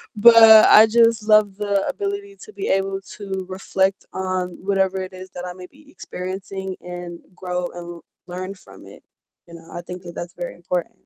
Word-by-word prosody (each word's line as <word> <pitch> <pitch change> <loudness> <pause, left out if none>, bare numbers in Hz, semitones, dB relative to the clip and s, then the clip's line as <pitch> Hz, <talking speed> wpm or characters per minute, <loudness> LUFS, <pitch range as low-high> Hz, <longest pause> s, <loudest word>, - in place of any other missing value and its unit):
but 230 +3 +7 0.3
I 220 +1 +8
just 230 -1 +3
love 215 -2 +4
the 200 -1 -1
ability 400 +5 -4
to 425 - -14
be 400 - -5
able 195 0 0 0.2
to 190 -2 -5
reflect 190 0 -1
on 185 -1 -2
whatever 190 -1 0
it 185 - -7
is 185 0 -10
that 180 0 -7
I 180 - -6
may 180 0 -11
be 290 +1 -22
experiencing, 190 -2 -6
and 175 -1 -8 0.2
grow, 180 -1 -3
and 175 -1 -9 0.3
learn 185 +2 -6
from - - -16
it. - - -15 0.5
You 170 - -11
know, 165 0 -15
I 175 - -6
think 180 +1 -9
that 175 -1 -10
that's 175 +1 -7
very 175 - -6
important. 175 0 -3
190 Hz, 185 wpm, -21 LUFS, 180-205 Hz, 0.5 s, I